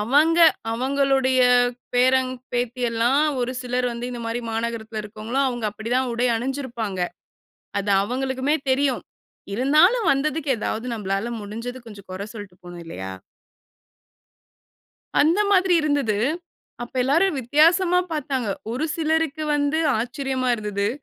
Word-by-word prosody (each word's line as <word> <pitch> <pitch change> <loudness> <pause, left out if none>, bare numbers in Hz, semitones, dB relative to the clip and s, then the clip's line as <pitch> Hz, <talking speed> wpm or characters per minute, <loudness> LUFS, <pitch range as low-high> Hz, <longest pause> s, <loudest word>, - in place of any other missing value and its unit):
அவங்க 295 +9 +3 0.3
அவங்களுடைய 265 +1 +1 0.6
பேரன், 255 +1 +3 0.2
பேத்தி 245 +1 -2
எல்லாம் 235 +5 +2 0.2
ஒரு 245 +1 -1
சிலர் 250 0 -1
வந்து 240 +1 -5
இந்த 240 - -6
மாரி 230 +1 -2
மாநகரத்தில 225 -1 -3
இருக்கிறவங்களும் 225 +6 -2
அவங்க 240 -3 -3
அப்டி 220 +3 -7
தான் 260 -1 0
உடை 240 +2 +1
அணுஞ்சுருப்பாங்க. 240 -6 -4 0.8
அது 200 0 -1
அவங்களுக்குமே 260 +5 -1
தெரியும். 265 -1 +1 0.5
இருந்தாலும் 310 - +4
வந்ததுக்கு 290 +1 -1
ஏதாவது 220 +2 -3
நம்மளால 200 +2 -2
முடுஞ்சது 230 +5 -6
கொஞ்சம், 205 -3 -12
கொற 190 +2 -5
சொல்ட்டு 205 -4 -9
போணும். 175 -1 -9
இல்லையா? 95 - -6 2.1
அந்த 335 +7 +3
மாதிரி 370 -2 +4
இருந்தது. 285 -8 +1 0.7
அப்ப 240 - -9
எல்லாரும் 320 +5 +2
வித்தியாசமா 340 +8 +4
பாத்தாங்க. 265 -6 -2 0.2
ஒரு 275 +6 -1
சிலருக்கு 315 -1 0
வந்து, 290 +2 +1 0.2
ஆச்சரியமா 260 +1 -2
இருந்தது. 205 -2 -2
255 Hz, 120 wpm, -23 LUFS, 225-285 Hz, 2.1 s, இருந்தாலும்